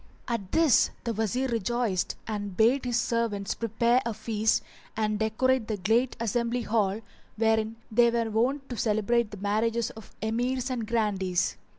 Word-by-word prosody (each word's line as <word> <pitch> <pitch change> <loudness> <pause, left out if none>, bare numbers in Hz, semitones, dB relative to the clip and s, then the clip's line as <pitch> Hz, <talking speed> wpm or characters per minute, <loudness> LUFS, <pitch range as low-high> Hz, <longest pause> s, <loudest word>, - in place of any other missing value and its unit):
At 230 -6 -3
this 320 -7 +4
the 235 - -2
Wazir 225 +5 0
rejoiced 230 -3 -1
and 205 -3 -4
bade 245 +5 +3
his 240 -1 +1
servants 225 -4 -1
prepare 235 +2 +1
a 230 -2 -3
feast 220 0 0 0.3
and 215 -1 0
decorate 225 +2 +1
the 215 - -2
great 225 +7 +1
assembly 235 +2 -1
hall, 215 -2 0 0.3
wherein 220 0 +1 0.2
they 235 +2 +5
were 230 -1 0
wont 265 +6 0
to 245 - -5
celebrate 220 +1 +1
the 210 - -9
marriages 220 +3 0
of 220 -2 -13
Emirs 245 +3 -1
and 235 -4 -3
Grandees. 195 -6 0
225 Hz, 155 wpm, -27 LUFS, 215-240 Hz, 0.3 s, they